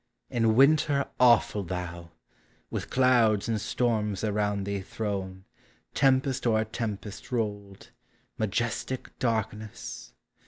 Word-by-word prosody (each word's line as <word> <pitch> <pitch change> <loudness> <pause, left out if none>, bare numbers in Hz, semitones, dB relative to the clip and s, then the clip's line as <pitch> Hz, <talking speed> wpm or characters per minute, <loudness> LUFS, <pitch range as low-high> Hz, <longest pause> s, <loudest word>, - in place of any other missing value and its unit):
In 115 -2 +2
Winter 140 +1 +4
awful 120 -4 +5
thou! 85 -2 -5 0.6
with - - -4
clouds 120 -5 +3
and 110 -2 -1
storms 110 -3 0
Around 105 -1 0
thee 100 0 -3
thrown, 95 -2 -4 0.5
tempest 130 -1 +2
o'er 110 -1 +2
tempest 105 -1 -5
rolled. 105 -4 -4 0.4
Majestic 115 +4 -2
darkness! 110 -3 -3
110 Hz, 95 wpm, -28 LUFS, 100-120 Hz, 0.6 s, awful